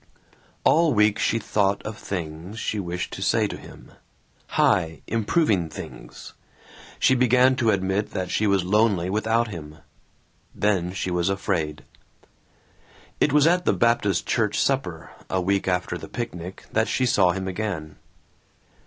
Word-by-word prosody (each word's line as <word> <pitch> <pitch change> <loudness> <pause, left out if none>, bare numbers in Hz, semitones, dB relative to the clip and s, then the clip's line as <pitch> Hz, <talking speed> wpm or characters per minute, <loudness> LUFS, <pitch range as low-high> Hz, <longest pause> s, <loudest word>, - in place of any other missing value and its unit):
All 160 -4 +4
week 105 0 +3
she 115 - +1
thought 100 -2 0
of 105 0 -5
things 85 0 -6
she 110 - -2
wished 90 -1 -4
to - - -6
say - - +2
to - - -4
him. - - -13 0.7
High, 80 -2 +2
improving 110 - +1
things. - - -10 0.6
She - - +4
began 125 +1 +4
to 115 -3 +2
admit 95 +1 0
that 95 -1 -4
she 110 - +1
was 100 -2 +2
lonely 95 -2 +2
without 110 +2 +1
him. 75 -5 -8 0.8
Then 95 -4 +1
she 95 -1 -3
was 90 +1 +1
afraid. 80 -6 -2 1.4
It 150 - +3
was 150 0 +4
at 175 +2 +3
the - - +3
Baptist 110 -6 +1
church - - 0
supper, - - -1 0.2
a 95 - 0
week 95 +2 0
after 90 -1 -1
the - - -9
picnic, 95 -7 -6
that 110 +1 +1
she 130 - +1
saw 100 -8 +4
him 95 0 -4
again. 90 -6 -4
100 Hz, 145 wpm, -24 LUFS, 90-115 Hz, 1.4 s, All